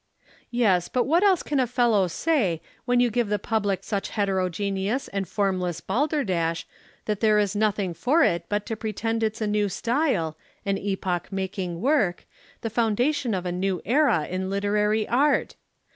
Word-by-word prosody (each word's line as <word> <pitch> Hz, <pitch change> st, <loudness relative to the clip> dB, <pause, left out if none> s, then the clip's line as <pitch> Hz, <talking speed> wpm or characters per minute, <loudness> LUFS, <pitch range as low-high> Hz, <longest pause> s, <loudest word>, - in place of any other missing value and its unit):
"Yes, 205 Hz, -8 st, +2 dB
but 250 Hz, -, +1 dB
what 330 Hz, +5 st, +3 dB
else 390 Hz, -4 st, +4 dB
can 290 Hz, -2 st, -1 dB
a 255 Hz, -, +2 dB
fellow 235 Hz, -6 st, +2 dB
say, 195 Hz, -, 0 dB, 0.3 s
when 245 Hz, -1 st, +2 dB
you 245 Hz, -1 st, +3 dB
give 235 Hz, -1 st, 0 dB
the 210 Hz, -, +1 dB
public 205 Hz, -2 st, -1 dB
such 200 Hz, -1 st, -3 dB
heterogeneous 195 Hz, +3 st, -1 dB
and 195 Hz, -2 st, -3 dB
formless 185 Hz, -3 st, -1 dB
balderdash 190 Hz, -, 0 dB, 0.4 s
that 210 Hz, -2 st, -1 dB
there 215 Hz, -1 st, +4 dB
is 205 Hz, -1 st, +1 dB
nothing 205 Hz, -3 st, 0 dB
for 260 Hz, -, +2 dB
it 170 Hz, -, +1 dB
but 205 Hz, 0 st, -1 dB
to 225 Hz, -, -3 dB
pretend 225 Hz, +1 st, -2 dB
it's 220 Hz, +1 st, -1 dB
a -, -, +1 dB
new 210 Hz, -1 st, +1 dB
style, 230 Hz, -, 0 dB, 0.3 s
an 195 Hz, -1 st, 0 dB
epoch 190 Hz, -3 st, -2 dB
making 190 Hz, -3 st, -3 dB
work, 235 Hz, -, +1 dB, 0.4 s
the 225 Hz, -, -3 dB
foundation 235 Hz, +2 st, +1 dB
of 185 Hz, -1 st, -3 dB
a 180 Hz, -, -1 dB
new 185 Hz, 0 st, -1 dB
era 240 Hz, -, +3 dB
in 185 Hz, +2 st, -3 dB
literary 210 Hz, +2 st, +1 dB
art? 280 Hz, +5 st, +2 dB
210 Hz, 165 wpm, -25 LUFS, 190-240 Hz, 0.4 s, else